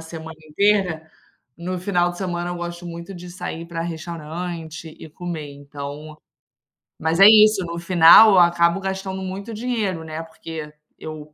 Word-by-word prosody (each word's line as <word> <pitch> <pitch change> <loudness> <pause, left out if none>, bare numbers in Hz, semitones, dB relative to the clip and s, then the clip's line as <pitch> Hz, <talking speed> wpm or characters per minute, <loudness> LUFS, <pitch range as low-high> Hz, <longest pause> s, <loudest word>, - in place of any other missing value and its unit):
semana 160 -1 -9
inteira, 180 -3 +1 0.5
no 180 +2 -4
final 175 -1 0
de 175 - -12
semana 175 -2 -3
eu 175 - -4
gosto 175 0 -6
muito 170 +2 -8
de 180 0 -10
sair 175 -2 -6
pra 170 -1 -5
restaurante 165 0 -7
e - - -11
comer, 155 -3 -6
então 145 +2 -9 0.8
mas 160 +2 -1
é 195 - +9
isso, 215 -3 +6
no 170 0 -5
final 175 +5 +7
eu 190 - +6
acabo 170 +1 +3
gastando 190 0 -4
muito 195 +4 -6
dinheiro, 215 -7 -2
né, 160 0 -6
porque 160 -1 -9 0.3
eu 155 -1 -9
170 Hz, 155 wpm, -21 LUFS, 160-185 Hz, 0.8 s, é